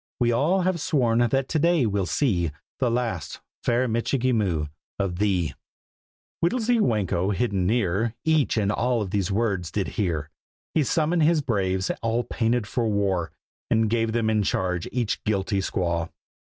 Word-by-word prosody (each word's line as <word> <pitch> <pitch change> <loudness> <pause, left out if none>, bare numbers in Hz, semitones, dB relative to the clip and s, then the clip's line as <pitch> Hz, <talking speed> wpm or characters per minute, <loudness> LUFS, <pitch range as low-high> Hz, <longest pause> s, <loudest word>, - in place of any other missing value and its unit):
We 120 -1 +3
all 155 +11 +2
have 185 -1 0
sworn 120 -7 +2
that 135 +2 +1
to 160 - 0
day 170 -3 +3
we'll 100 -3 0
see 90 - +1 0.3
The 130 -3 +2
last, 115 - -2 0.2
fair 120 +2 +2
Michikee 125 +2 0
Moo, 90 -9 +1 0.3
of 95 -3 -2
thee!" 95 -6 +1 0.9
Whittlesy 235 +5 +2
Whanko, 100 - +1
hidden 100 -5 0
near, 110 +1 +1
Each 155 -6 +2
and 105 -2 +2
all 120 +1 +1
of 95 - -6
these 100 -1 0
words 100 -5 0
did 100 +3 -2
hear. 80 -8 -2 0.4
He 160 - +3
summoned 160 +5 +1
his 160 0 +4
braves, 95 -5 0
all 115 +1 0
painted 115 -1 0
for 115 +2 -1
war, 95 -5 0 0.4
And 110 -1 +2
gave 115 -1 +1
them 115 -1 0
in 110 -1 +2
charge 90 -3 -1
each 120 -4 -1
guilty 100 -1 0
squaw. 85 -3 -1
110 Hz, 160 wpm, -25 LUFS, 95-125 Hz, 0.9 s, his